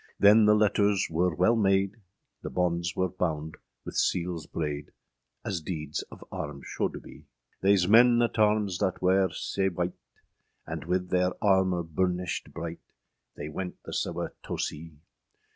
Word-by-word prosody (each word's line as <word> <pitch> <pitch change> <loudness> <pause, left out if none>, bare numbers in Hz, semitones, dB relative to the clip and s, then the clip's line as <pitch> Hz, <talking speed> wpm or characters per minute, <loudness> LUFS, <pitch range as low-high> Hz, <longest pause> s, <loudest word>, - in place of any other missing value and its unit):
â - - -30
Then 105 +2 +7
the 105 0 +6
lettres 105 -1 +2
wer 90 +3 +2
wele 95 +8 +4
made, 100 -1 +2 0.4
The - - -5
bondes 85 -2 -1
wer 95 - +1
bounde 80 -4 -3 0.3
wyth - - -6
seales 85 -3 0
brade, 75 -2 -3 0.6
As 95 -5 -2
deeds 75 -3 -4
of - - -12
arms 75 -2 -6
sholde - - -3
bee. - - -14 0.4
Theise 95 -2 +4
men 120 +3 +6
at 115 -1 -1
arms 105 -4 +2
thatte 95 -3 0
wer 95 +1 +3
sea 95 +4 -1
wight, 90 0 -2 0.7
And - - -6
wyth 90 +1 -1
theire 90 0 +2
armour 95 -3 +3
burnished 90 +2 -2
bryght, 85 0 -6 0.6
They 75 - -6
went 90 +3 -5
the - - -8
sewe - - -2
toe - - -5
see. 80 0 -5
90 Hz, 155 wpm, -28 LUFS, 85-100 Hz, 0.7 s, Then